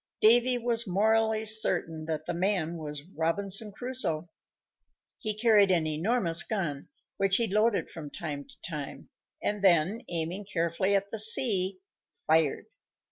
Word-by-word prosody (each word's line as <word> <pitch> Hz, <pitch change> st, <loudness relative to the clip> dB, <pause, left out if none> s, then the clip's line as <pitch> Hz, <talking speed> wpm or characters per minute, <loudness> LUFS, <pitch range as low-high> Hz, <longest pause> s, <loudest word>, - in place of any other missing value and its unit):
Davy 240 Hz, +3 st, +4 dB
was 235 Hz, -1 st, 0 dB
morally 220 Hz, +3 st, +1 dB
certain 175 Hz, -7 st, +3 dB
that 155 Hz, -1 st, -4 dB
the 175 Hz, -, -4 dB
man 175 Hz, -2 st, -1 dB
was 150 Hz, -2 st, -7 dB
Robinson 195 Hz, +5 st, -1 dB
Crusoe. 195 Hz, -9 st, 0 dB, 0.9 s
He 215 Hz, -2 st, 0 dB
carried 215 Hz, -3 st, +4 dB
an 170 Hz, -4 st, +1 dB
enormous 170 Hz, +2 st, +2 dB
gun, 170 Hz, -10 st, -4 dB, 0.3 s
which 195 Hz, 0 st, +2 dB
he 235 Hz, -, +1 dB
loaded 215 Hz, +2 st, 0 dB
from 155 Hz, -3 st, -9 dB
time 145 Hz, -2 st, -7 dB
to -, -, -16 dB
time, 150 Hz, -5 st, -8 dB, 0.3 s
and 205 Hz, -1 st, -3 dB
then, 185 Hz, +4 st, +2 dB
aiming 175 Hz, +4 st, -4 dB
carefully 170 Hz, +3 st, 0 dB
at 200 Hz, 0 st, -2 dB
the 225 Hz, -, -4 dB
sea, 205 Hz, -4 st, +3 dB, 0.5 s
fired. 160 Hz, -2 st, +1 dB
190 Hz, 135 wpm, -28 LUFS, 165-220 Hz, 0.9 s, Davy